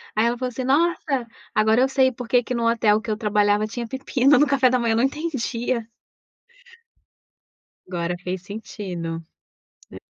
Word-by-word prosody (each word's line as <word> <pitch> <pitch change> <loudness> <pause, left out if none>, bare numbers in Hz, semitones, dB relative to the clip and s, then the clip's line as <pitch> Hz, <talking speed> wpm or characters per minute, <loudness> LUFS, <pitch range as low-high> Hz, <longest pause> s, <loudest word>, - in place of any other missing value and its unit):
Aí 220 +2 +3
ela 240 +1 0
falou 255 0 -2
assim: 250 +2 -5
"Nossa! 275 -3 +1 0.3
Agora 220 +3 +4
eu 265 - +3
sei 265 -1 +3
porque 245 0 0
que 250 - -4
no 235 -1 +1
hotel 220 -2 +3
que 225 - -8
eu 210 - -1
trabalhava 210 -1 +2
tinha 235 +2 -5
pepino 265 +1 +2
no 295 - +5
café 270 -2 +3
da 255 - +2
manhã. 235 -2 0
Eu - - +1
não 235 - +2
entendia." 255 -5 -2 2.0
Agora 175 -1 -2
fez 180 0 -4
sentido. 180 -5 -6 0.7
É. - - -11
235 Hz, 165 wpm, -23 LUFS, 210-260 Hz, 2.0 s, no